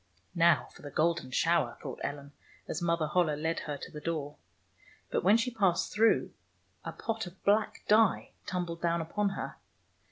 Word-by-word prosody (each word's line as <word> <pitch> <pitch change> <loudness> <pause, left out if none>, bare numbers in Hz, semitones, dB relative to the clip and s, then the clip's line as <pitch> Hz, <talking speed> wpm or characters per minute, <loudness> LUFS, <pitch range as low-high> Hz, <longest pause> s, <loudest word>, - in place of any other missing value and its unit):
"Now 170 -5 +4
for - - -15
the 145 - -7
golden 160 -1 0
shower," 150 -2 +1
thought - - -7
Ellen, 140 0 -5 0.4
as 160 - -3
Mother 170 -2 +1
Holle 155 -1 +2
led 160 +2 -1
her 145 -1 -4
to - - -9
the 150 - -8
door. 150 -3 -3 0.8
But - - 0
when 200 +5 +6
she 250 +2 -1
passed 195 -7 +1
through, 225 +2 +3 0.5
a - - -4
pot 225 -3 -3
of 180 +2 -14
black 210 +1 +2
dye 215 0 +4 0.2
tumbled 175 -3 -3
down 170 0 +1
upon 200 +5 0
her. 135 - -5
170 Hz, 170 wpm, -31 LUFS, 150-200 Hz, 0.8 s, when